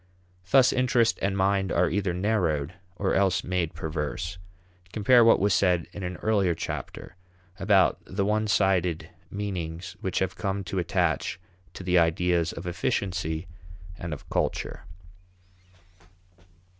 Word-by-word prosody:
Thus 130 +5 +5
interest 125 -2 +2
and 100 0 0
mind 95 -1 +1
are 90 +1 +3
either 95 +1 0
narrowed, 90 -6 0 0.2
or 95 +1 -1
else 95 -3 +2
made 90 -3 -2
perverse. 80 +3 -4 0.5
Compare 115 +3 +5
what 115 - +6
was 100 0 +2
said 90 -3 +2
in 100 - -7
an 90 -1 -4
earlier 100 -6 +2
chapter 80 - -6 0.4
about 95 -1 +3
the 100 +1 -2
one 110 +1 +1
sided 90 -5 +1 0.2
meanings 90 -4 -5
which - - -2
have - - 0
come 100 0 -2
to 95 +1 -3
attach 85 +1 0 0.4
to - - -7
the 90 -1 +3
ideas 85 0 +1
of 85 - -8
efficiency 90 -1 -2 0.5
and 85 -2 -6
of 75 - -7
culture. 75 - -2
90 Hz, 130 wpm, -26 LUFS, 85-100 Hz, 0.5 s, what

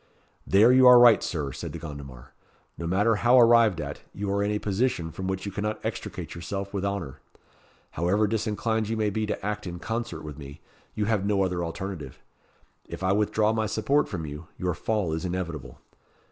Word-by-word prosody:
"There 105 +5 +6
you 130 0 +7
are 125 0 +10
right, 120 -2 +7
Sir," 75 -5 -3
said - - -6
De - - -5
Gondomar. 70 -6 -9 0.4
"No 85 - -5
matter 105 +5 +2
how 120 +4 +5
arrived 115 -6 +5
at, - - -5
you 100 0 -3
are 100 - +1
in 100 - 0
a 105 - 0
position 100 -5 -1
from 95 +3 -5
which 95 0 -3
you 100 - -4
cannot 105 +2 -3
extricate - - -5
yourself 95 +3 -5
with 100 -1 -2
honour. 100 -9 -3 0.7
However 95 +6 +1
disinclined 110 0 -1
you 115 - -1
may 105 -1 0
be 110 +1 -2
to 105 - -4
act 105 -1 -3
in 85 0 -5
concert 110 -1 -4
with 75 -1 -8
me, 70 -1 -10 0.4
you 105 - 0
have 105 -2 +1
no 100 -1 +2
other 90 -2 -1
alternative. 85 -4 -6 0.7
If - - -7
I 95 - +2
withdraw 105 +1 +2
my 110 -1 0
support 135 +7 +1
from 85 -6 -4
you, 75 +3 -8
your 90 -1 -1
fall 100 -2 -1
is 80 - -3
inevitable. 85 -9 -5
100 Hz, 195 wpm, -26 LUFS, 85-110 Hz, 0.7 s, are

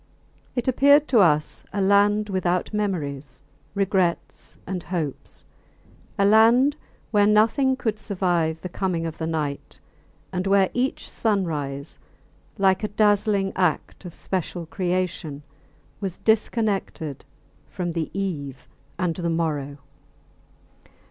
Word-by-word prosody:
It 245 -1 -2
appeared 285 +3 +5
to 240 - +5
us 155 -5 +2
a 200 - -3
land 205 +2 +3
without 185 0 -1
memories, 145 -10 -3 0.3
regrets, 190 -3 -1
and 185 -1 -4
hopes; 160 -4 -5 0.7
a 200 - +3
land 230 +7 +5 0.4
where 205 -2 +4
nothing 225 +6 +3
could 220 -5 -2
survive 175 -6 0
the - - -4
coming 175 -2 -2
of 160 -1 -6
the 160 - -2
night, 150 -3 -4 0.5
and 185 +1 -2
where 195 -1 +3
each 255 +2 -1
sunrise, 155 -9 -2 0.6
like 190 0 +3
a - - +1
dazzling 205 -1 +2
act 180 -2 -1
of 175 -2 -8
special 180 -2 -3
creation, 175 -4 -2 0.6
was 190 -4 -3
disconnected 210 - 0 0.5
from 175 -1 -3
the 165 -2 -2
eve 145 -9 -4 0.3
and 175 -3 -1
the 170 -2 -1
morrow. 150 -4 -2
185 Hz, 115 wpm, -24 LUFS, 165-210 Hz, 0.7 s, appeared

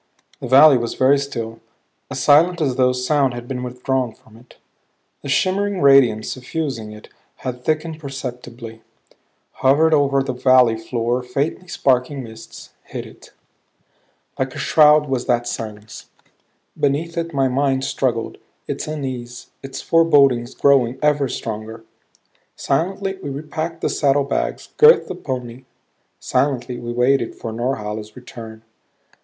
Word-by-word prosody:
The - - -6
valley 135 +1 +7
was 120 -1 -4
very 135 +2 +4
still; 115 -5 -5 0.5
as - - -5
silent 165 +5 +4
as 140 -5 0
though 125 -1 +3
sound 125 0 0
had 120 0 -8
been 125 -1 -4
withdrawn 125 -1 -2
from 110 - -21
it. 120 +2 -18 0.7
The 140 - -7
shimmering 195 +5 +1
radiance 135 -6 +4
suffusing 130 -4 -4
it 105 0 -12 0.4
had 125 -1 -4
thickened 155 +1 -2
perceptibly; 125 -5 -8 0.8
hovered 150 +5 +4
over 140 -2 +3
the 135 -1 -3
valley 125 -2 +4
floor 120 +2 -2
faintly 140 +8 -3
sparkling 130 -3 0
mists; 110 -1 -12
hid - - -7
it. - - -16 1.1
Like 130 0 -2
a - - -7
shroud 150 -1 +5
was 130 -2 -2
that 120 -1 +1
silence. 105 -1 -7 0.7
Beneath 150 +4 -1
it 165 0 -3
my 135 -3 +1
mind 135 0 0
struggled, 125 -4 -2 0.3
its - - -4
unease, 125 -5 -6
its 135 -1 -7
forebodings 140 -7 +3
growing 130 -3 +3
ever 145 -2 +2
stronger. 110 0 -6 0.7
Silently 190 +6 -1
we 145 - -5
repacked 155 +4 -5
the - - 0
saddlebags; 140 -1 0
girthed 455 +2 +6
the - - -3
pony; 125 -1 -6 0.5
silently 125 -2 -1
we 120 0 -5
waited 125 0 +1
for 115 - -6
Norhala's 110 -3 -4
return. 115 -3 -11
130 Hz, 135 wpm, -20 LUFS, 120-145 Hz, 1.1 s, valley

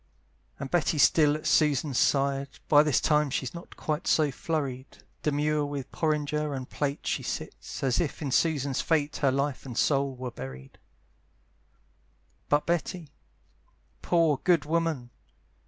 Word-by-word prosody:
And 135 -1 -6
Betty's 165 -4 +3
still 150 -2 +4
at 155 - -7
Susan's 145 -3 +2
side: 140 0 +2 0.2
By 145 -1 +7
this 150 -4 +2
time 150 -2 +2
she's 135 - -3
not 170 0 -10
quite 155 +1 -3
so 150 -3 +3
flurried; 135 -3 -4 0.2
Demure 150 0 +1
with 140 -2 -5
porringer 150 -1 -1
and 130 -1 -5
plate 145 0 -3
She - - -1
sits, - - -6
as 130 +3 +2
if 160 - -3
in 145 -4 -3
Susan's 140 -3 +1
fate 150 -2 0
Her 140 -2 +2
life 140 +1 -1
and 125 -3 -8
soul 140 -2 +1
were 125 -1 -6
buried. 65 - -9 1.7
But 145 0 +2
Betty, 170 -2 -2 0.9
poor 165 -5 +2
good 170 -6 +3
woman! 160 -6 -1
145 Hz, 140 wpm, -28 LUFS, 135-155 Hz, 1.7 s, By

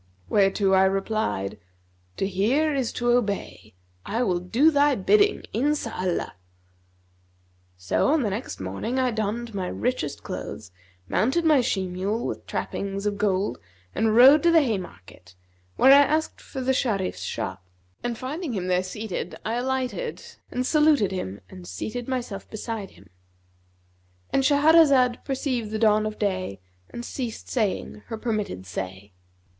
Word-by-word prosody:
Whereto 195 -1 +3
I 190 0 +6
replied, 195 - -1 0.6
'To 195 - 0
hear 245 +12 +1
is 265 -4 -1
to 240 0 +1
obey; 200 - -2 0.3
I 230 +4 -1
will 180 -6 +1
do 235 - +3
thy 285 -1 +4
bidding, 410 - +3
Inshallah!' 240 - -1 1.4
So 90 0 0
on 295 0 +3
the 210 - -1
next 215 +6 -5
morning 100 - -3
I 255 -1 +2
donned 220 +1 -3
my 190 -2 -2
richest 210 - -2
clothes, 100 -3 -6 0.4
mounted 265 - +1
my 300 -4 +5
she 195 -5 0
mule 190 +5 -2
with - - -5
trappings 200 0 -3
of 205 -1 -1
gold 195 - 0 0.3
and 220 0 +1
rode 270 +6 +8
to 345 - +4
the 325 -2 +6
Haymarket 135 - -6 0.4
where 265 - +6
I 280 +1 +9
asked 310 +2 0
for 265 - -7
the 260 +1 +1
Sharif's 205 -8 -1
shop, 95 -4 -4 0.4
and 240 -1 -2
finding 290 +3 -4
him 185 -3 -3
there 180 0 +3
seated, 185 -1 -5
alighted 255 - -2 0.3
and 250 +1 -2
saluted 300 -8 +3
him 100 - -5
and 90 -2 -12
seated 220 - -5
myself 245 -7 -4
beside 215 -2 -5
him"—And 90 - -9
Shahrazad 285 -3 +5
perceived 260 -5 -2
the 215 - -2
dawn 215 -1 +3
of 215 - -6
day 185 - -2 0.3
and 240 - -7
ceased 240 -4 -5
saying 215 -2 -2
her 225 - -5
permitted 215 - -3
say. 95 +2 -6
215 Hz, 140 wpm, -25 LUFS, 185-255 Hz, 1.4 s, I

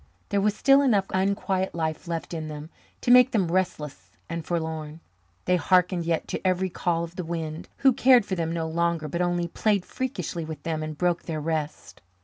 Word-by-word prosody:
There 200 -1 +1
was 210 +1 +1
still 275 +1 +5
enough 215 -8 +3
unquiet 190 -1 0
life 160 0 -3
left 170 0 -4
in 160 -2 -4
them 150 +1 -8 0.3
to 245 - +2
make 250 +1 +8
them 190 -9 0
restless 175 -6 -2 0.2
and 170 -1 -4
forlorn. 160 -2 -4 0.5
They 180 0 +3
hearkened 180 -1 +2
yet 165 -1 0
to - - -3
every 185 0 +1
call 170 -1 -1
of 170 +1 -8
the 180 - -2
wind, 165 -1 -5
who 270 -2 +4
cared 250 -2 +5
for 195 - -4
them 165 -3 -1
no 165 -1 -2
longer 170 -1 0
but 170 +4 -2
only 175 -1 0
played 200 +2 0
freakishly 185 - -4
with 160 -1 -7
them 160 -2 -2
and 155 -1 -5
broke 175 0 +1
their 160 -2 -3
rest. 155 -1 -4
170 Hz, 195 wpm, -26 LUFS, 160-190 Hz, 0.5 s, make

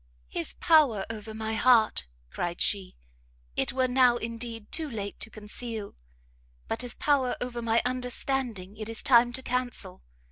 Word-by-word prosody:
"His 170 - -3
power 285 - +4
over 220 0 -7
my 220 0 -3
heart," 225 - +4 0.2
cried 175 0 -3
she, 195 -2 +1 0.6
"it - - +1
were 260 0 +1
now, 250 -1 +4
indeed, 230 -1 -5
too 315 -2 -1
late 205 -4 -5
to - - -4
conceal, 215 0 -5 0.7
but - - -1
his 245 -1 -2
power 275 -4 +2
over 245 -1 -3
my 230 0 +2
understanding 250 -5 -2
it 215 0 -6
is 225 - +2
time 240 -1 +6
to 260 - -2
cancel. 245 -7 -2
235 Hz, 150 wpm, -28 LUFS, 215-250 Hz, 0.7 s, time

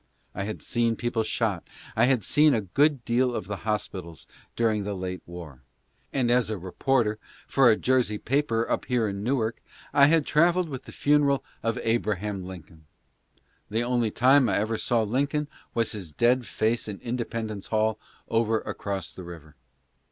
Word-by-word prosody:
I 100 - -3
had 110 0 -6
seen 115 -1 +1
people 120 0 -1
shot, 110 -4 -1 0.3
and 110 - +1
I - - +7
had 130 -5 +2
seen 150 +3 +4
a 110 - +1
good 135 - +1
deal 125 +1 +1
of - - -3
the 100 +1 -4
hospitals 95 -6 -4 0.3
during 110 -3 +1
the 100 0 -3
late 90 -1 -4
war; 85 -7 -9 0.5
and 125 -3 +1
as 125 -2 +3
a 110 - -2
reporter 105 +4 0 0.3
for 135 -3 +4
a - - +6
Jersey 125 -5 +1
paper 115 -2 0
up - - -1
here 120 -3 +1
in 100 0 -4
Newark, 115 -2 -1 0.3
I 140 -1 +7
had 160 -1 +3
travelled 170 +2 +3
with 130 -3 -6
the - - -10
funeral 145 -1 +2 0.2
of 115 +1 -1
Abraham 105 -4 -1
Lincoln. 80 -4 -11 0.8
The 110 +3 0
only 120 -2 +1
time 130 +2 +4
I - - +2
ever 110 +2 -1
saw 120 -3 +1
Lincoln 140 +7 0 0.3
was 115 -1 +1
his 95 -7 -6
dead 120 - +2
face 110 +1 0
in 105 -2 -5
Independence 115 -4 -4
Hall 110 -1 +1 0.3
over 115 -1 +1
across 100 -4 -4
the 95 - -9
river. 80 -4 -11
115 Hz, 175 wpm, -26 LUFS, 100-125 Hz, 0.8 s, I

